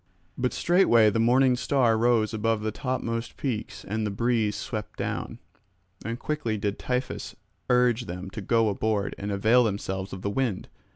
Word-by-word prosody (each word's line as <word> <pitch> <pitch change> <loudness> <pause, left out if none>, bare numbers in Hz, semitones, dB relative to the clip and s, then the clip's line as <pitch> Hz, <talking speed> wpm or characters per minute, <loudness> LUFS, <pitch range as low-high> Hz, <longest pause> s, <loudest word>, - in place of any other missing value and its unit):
But 125 0 0
straightway 120 - +4
the 115 - 0
morning 125 +2 +4
star 125 -2 +2
rose 115 -1 +2
above 110 0 0
the 110 0 -2
topmost 115 -2 -3
peaks 120 -6 -4
and 110 +3 -2
the 105 - 0
breeze 110 0 0
swept 105 0 -5
down; - - -3 0.7
and 115 +2 -3
quickly 135 -6 -2
did 100 0 -2
Tiphys 125 0 -3 0.3
urge 125 -1 +3
them 90 +2 -6
to 110 - -6
go 115 +3 +2
aboard 105 0 -1
and 100 +1 -3
avail 110 +5 +4
themselves 95 -2 -3
of 95 - -7
the 100 - -1
wind. 115 -4 -2
115 Hz, 165 wpm, -26 LUFS, 105-125 Hz, 0.7 s, straightway